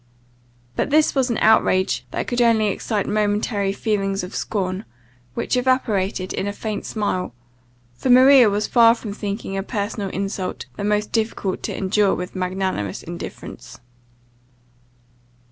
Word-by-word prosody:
But - - -1
this 305 +1 +3
was 265 -2 +1
an 235 - 0
outrage 185 - +3
that - - -3
could 245 0 -1
only 225 -3 +4
excite 205 +1 -2
momentary 205 -1 0
feelings 195 -2 -1
of 180 - -7
scorn, 190 -1 -2 0.5
which - - -1
evaporated 215 -7 0
in 195 - -2
a 205 - -2
faint 210 0 -5
smile; 185 - -2 0.6
for 120 - -3
Maria 255 -1 +7
was 205 +1 0
far 230 -1 +5
from 215 -3 -7
thinking 200 -1 -4
a 195 - -1
personal 205 -1 -3
insult 195 -1 -4
the 205 - -5
most 210 0 0
difficult 220 -4 -1
to - - -4
endure 195 +1 +2
with 180 +2 -6
magnanimous 185 - -2
indifference. 170 +1 -9
205 Hz, 140 wpm, -22 LUFS, 190-225 Hz, 0.6 s, Maria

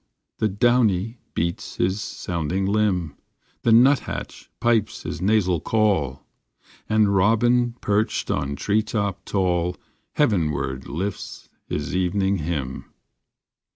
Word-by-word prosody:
The 110 - +2
Downy 115 0 +2 0.2
beats 85 +1 -2
his 95 +3 0
sounding 90 +1 -2
limb, 95 -7 0 0.4
The 115 - +2
nuthatch 125 +5 +2
pipes 115 -3 +1
his - - -5
nasal 95 -4 +2
call, 95 -12 +1 0.6
And 105 -2 +3
robin 120 +4 +3
perched 105 +1 0
on 70 +1 -1
treetop 100 +2 -1
tall 90 -2 0 0.4
Heavenward 75 - 0
lifts 95 +6 -5 0.2
his 75 +4 -3
evening 95 +2 +1
hymn. 75 -5 -3
100 Hz, 100 wpm, -23 LUFS, 85-110 Hz, 0.6 s, And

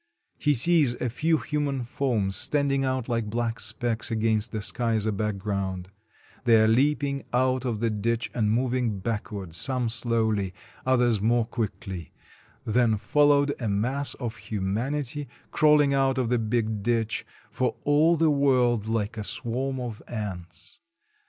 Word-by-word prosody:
He 150 -1 +2
sees 145 -1 +4
a 120 - -3
few 160 +6 +1
human 145 -4 -2
forms 115 -7 -1
standing 140 +3 +1
out 130 -2 -1
like 115 -3 -1
black 115 +1 -2
specks 115 0 -1
against 110 0 0
the 110 - -3
sky 115 +2 -1
as 110 -1 -1
a 110 - +1
background; 100 -3 -3 0.5
They 115 -3 +5
are 110 - +5
leap 140 +7 +3
ing 140 -1 -1
out 130 +1 +1
of 115 -4 -2
the 115 -1 +1
ditch 115 +2 -1
and 110 -3 +1
moving 120 -1 0
backward, 100 -3 -4
some 125 - +1
slowly, 110 -5 +1 0.3
others 120 -5 +3
more 115 +2 +2
quickly; 105 - -5 0.5
then 115 -1 +2
followed 145 +4 +3
a 115 - -1
mass 125 +8 0
of 120 -2 -5
humanity, 115 +8 -3 0.2
crawling 150 -2 +4
out 135 -1 +2
of 125 -3 0
the 125 -1 +2
big 110 -1 -1
ditch 115 0 0 0.3
for 130 - -1
all 150 +4 +4
the 160 -1 +3
world 125 -6 +2
like 110 0 -1
a 105 - -3
swarm 130 +4 -3
of 120 -4 -5
ants. 95 -7 -6
115 Hz, 150 wpm, -26 LUFS, 110-130 Hz, 0.5 s, They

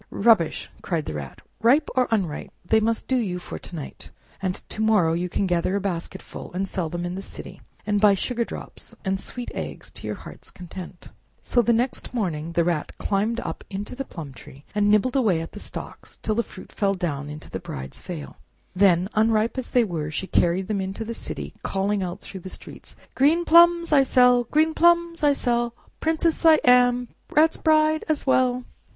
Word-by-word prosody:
"Rubbish!" 205 -6 +3
cried 165 -4 -2
the - - -4
Rat; 70 -3 -7 0.2
"ripe 270 +7 +4
or 255 -1 +3
unripe, 190 -9 -1
they 220 +5 +4
must 225 +1 -1
do 260 - +2
you 195 -7 -1
for 180 - -7
to 175 - -9
night, 150 -4 -8 0.3
and 185 -1 -1
to 215 - -4
morrow 210 -7 +3
you 175 +2 -1
can 195 - 0
gather 180 +1 +1
a - - +1
basketful, 180 -4 -5
sell 185 -4 -2
them 175 +2 -4
in 175 - -3
the 190 - -5
city, - - -8 0.2
and 205 -1 +1
buy 205 -2 +6
sugar 235 +4 -1
drops - - -9
and 190 0 0
sweet 245 +4 -5
eggs - - -6
to - - -7
your - - -2
heart's - - -11
content!" 180 0 -10 0.3
So 245 - +3
the 235 - +2
next 245 +2 -1
morning 170 -7 -2
the 170 - +3
Rat 170 -3 -2
climbed 215 +4 0
up - - -5
into 205 +3 -5
the 270 - -3
plum 155 - -9
tree, 140 +2 -14
and 205 -1 +2
nibbled 215 +5 +3
away 215 -11 +3
at 165 - -6
the - - -9
stalks - - -8
till 215 - -2
the 230 - +2
fruit - - -12
fell 200 -2 0
down 145 -6 -3
into 150 +1 -9
the - - -4
Bride's 65 0 -8
veil. 165 -5 -7 0.4
Then, 185 -2 +4
unripe 220 +1 +2
as 260 -2 -4
they 245 - +4
were, 165 -7 -3
she 155 +5 -3
carried 185 0 +1
them 205 -2 -1
into 190 +4 -4
the 230 - -4
city, - - -6
calling 195 +1 0
out 180 +1 -4
through 190 - -9
the 185 - -8
streets— - - -10 0.2
"Green 315 +6 +3
plums 340 0 +6
I 290 -2 +7
sell! 250 -2 +4
green 315 +6 +2
plums 340 0 +3
I 290 -1 +5
sell! 240 -3 0 0.2
Princess 320 +1 +1
am 250 -6 +5
I, - - -20
Rat's 320 +1 +5
bride 310 0 +3
as 310 -2 0
well!" 255 -2 +2
210 Hz, 200 wpm, -24 LUFS, 180-250 Hz, 0.4 s, I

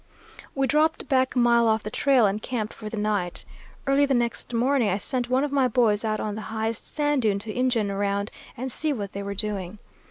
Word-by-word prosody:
We 270 -1 +1
dropped 310 +3 +1
back 260 -2 +1
a - - -2
mile 235 -1 +4
off 220 -1 +2
the 215 - -5
trail 265 -3 +3
and 205 +2 0
camped 225 -4 -3
for 215 - -8
the 220 - -6
night. 205 -4 -1 0.4
Early 280 +1 +3
the 270 - +2
next 240 -1 -1
morning 245 -1 +2
I 190 - +1
sent 245 +3 -1
one 260 +2 +2
of 295 - -2
my 275 -2 +3
boys 225 -3 +2
out 215 -1 -1
on 210 - -3
the 215 - -5
highest 220 0 -3
sand 295 -2 +1
dune 210 -3 +2
to 215 +2 -6
Injun 245 -5 +1
around 200 +1 -1 0.3
and 260 +2 -3
see 305 +3 +1
what 200 -6 -5
they 200 - -4
were 200 0 -5
doing. 200 -2 -3
230 Hz, 225 wpm, -25 LUFS, 210-260 Hz, 0.4 s, mile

